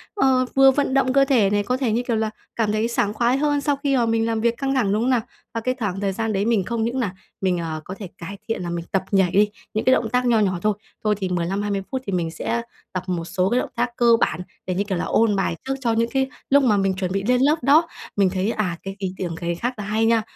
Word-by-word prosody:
ờ, 265 Hz, -8 st, +3 dB
vừa 270 Hz, 0 st, +7 dB
vận 275 Hz, 0 st, 0 dB
động 260 Hz, -1 st, +2 dB
cơ 275 Hz, 0 st, +5 dB
thể 240 Hz, -8 st, +3 dB
này, 205 Hz, 0 st, +1 dB
có 250 Hz, +5 st, -1 dB
thể, 255 Hz, -4 st, 0 dB
như 235 Hz, +3 st, 0 dB
kiểu 235 Hz, -, +1 dB
là, 220 Hz, 0 st, 0 dB, 0.3 s
cảm 220 Hz, -3 st, +1 dB
thấy 215 Hz, +2 st, +1 dB
sảng 210 Hz, -3 st, 0 dB
khoái 240 Hz, +3 st, +2 dB
hơn 290 Hz, 0 st, +1 dB
sau 285 Hz, 0 st, +1 dB
khi, 280 Hz, 0 st, -1 dB
ờ, 245 Hz, -3 st, +3 dB
mình 225 Hz, 0 st, +1 dB
làm 225 Hz, -1 st, -1 dB
việc 235 Hz, 0 st, +1 dB
căng 275 Hz, -1 st, -1 dB
thẳng, 210 Hz, -7 st, +2 dB
đúng 215 Hz, +2 st, +1 dB
không 250 Hz, -, +1 dB
nào? 250 Hz, -3 st, +3 dB, 0.3 s
Và 230 Hz, -, -2 dB
cái 255 Hz, +3 st, 0 dB
thoảng 200 Hz, -4 st, -2 dB
thời 195 Hz, -1 st, -1 dB
gian 225 Hz, +2 st, -2 dB
đấy 200 Hz, +1 st, 0 dB
mình 225 Hz, -4 st, +2 dB
không 230 Hz, +3 st, -2 dB
những 240 Hz, +3 st, -1 dB
nà 205 Hz, -6 st, -2 dB, 0.3 s
mình, 185 Hz, -2 st, +1 dB
ờ, 160 Hz, -2 st, -4 dB
có 185 Hz, -, -6 dB
thể 200 Hz, -, -6 dB
cải 190 Hz, +4 st, -7 dB
thiện 225 Hz, -5 st, -2 dB
nà 175 Hz, -, -4 dB
mình 170 Hz, -1 st, -4 dB
tập 195 Hz, -1 st, +1 dB
nhảy 190 Hz, -3 st, +3 dB
đi, 210 Hz, +1 st, +4 dB, 0.2 s
những 215 Hz, -, -1 dB
cái 255 Hz, -, +6 dB
động 225 Hz, -, +1 dB
tác 250 Hz, +2 st, +1 dB
nho 235 Hz, -2 st, +4 dB
nhỏ 190 Hz, -4 st, +1 dB
thôi. 215 Hz, +2 st, +2 dB, 0.3 s
Thôi 210 Hz, -1 st, +2 dB
thì 190 Hz, -2 st, -3 dB
15-20 195 Hz, +3 st, -1 dB
phút 260 Hz, -1 st, -2 dB
thì 200 Hz, -, -3 dB
mình 170 Hz, -3 st, -1 dB
sẽ 230 Hz, +8 st, -2 dB, 0.3 s
tập 185 Hz, -1 st, -2 dB
một 175 Hz, -2 st, -2 dB
số 180 Hz, +2 st, 0 dB
cái 245 Hz, -, +2 dB
động -, -, -3 dB
tác -, -, 0 dB
cơ 240 Hz, -, +2 dB
bản 160 Hz, -, 0 dB, 0.2 s
để, 185 Hz, -, -1 dB
như 195 Hz, -, +1 dB
kiểu 200 Hz, -3 st, -2 dB
là, -, -, -2 dB
ôn 220 Hz, -2 st, +2 dB
bài 195 Hz, -3 st, 0 dB
trước 270 Hz, -, 0 dB
cho 235 Hz, -3 st, +1 dB
những 230 Hz, +1 st, +1 dB
cái 265 Hz, 0 st, +1 dB, 0.2 s
lúc 280 Hz, 0 st, +5 dB
mà 215 Hz, -5 st, +3 dB
mình 195 Hz, -1 st, +1 dB
chuẩn 185 Hz, -1 st, -2 dB
bị 195 Hz, +1 st, -1 dB
lên 250 Hz, +3 st, +2 dB
lớp 290 Hz, +3 st, +4 dB
đó. 300 Hz, +6 st, +5 dB, 0.3 s
Mình 195 Hz, -2 st, +3 dB
thấy, 190 Hz, +3 st, -1 dB
à, 185 Hz, -7 st, -2 dB
cái 195 Hz, 0 st, -6 dB
ý 190 Hz, -2 st, -3 dB
tưởng 175 Hz, -3 st, -3 dB
cày 170 Hz, +1 st, -3 dB
khác 245 Hz, +8 st, -2 dB
là 210 Hz, -, -5 dB
hay 215 Hz, +2 st, 0 dB
nha. 230 Hz, 0 st, +3 dB
215 Hz, 295 wpm, -22 LUFS, 190-250 Hz, 0.3 s, vừa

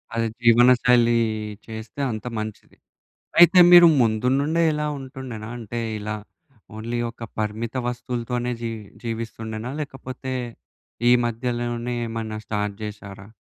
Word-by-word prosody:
అదే 115 Hz, 0 st, +1 dB, 0.2 s
జీవనశైలి 120 Hz, 0 st, +5 dB, 0.5 s
చేస్తే 110 Hz, +4 st, -8 dB
అంత 110 Hz, 0 st, -6 dB
మంచిది. 110 Hz, -1 st, -7 dB, 0.6 s
అయితే 175 Hz, +1 st, +8 dB
మీరు 175 Hz, -1 st, +10 dB, 0.2 s
ముందు 110 Hz, +1 st, +1 dB
నుండే 160 Hz, +4 st, +1 dB
ఇలా 150 Hz, 0 st, -1 dB
ఉంటుండేనా? 130 Hz, -5 st, -8 dB
అంటే, 120 Hz, +1 st, -5 dB, 0.2 s
ఇలా 105 Hz, +1 st, -4 dB, 0.6 s
ఓన్లీ 115 Hz, +2 st, -3 dB
ఒక 115 Hz, -, -15 dB, 0.2 s
పరిమిత 110 Hz, +2 st, -3 dB
వస్తువులతోనే 125 Hz, 0 st, -3 dB
జీ 115 Hz, -, -2 dB, 0.3 s
జీవిస్తుండేనా? 115 Hz, 0 st, -5 dB
లేకపోతే 130 Hz, -2 st, -6 dB, 0.8 s
ఈ -, -, +7 dB
మధ్యలోనే 120 Hz, 0 st, -2 dB
ఏమన్నా 110 Hz, -1 st, -4 dB
స్టార్ట్ 105 Hz, -1 st, -2 dB
జెశారా? 100 Hz, -1 st, -8 dB
115 Hz, 110 wpm, -23 LUFS, 110-125 Hz, 0.8 s, మీరు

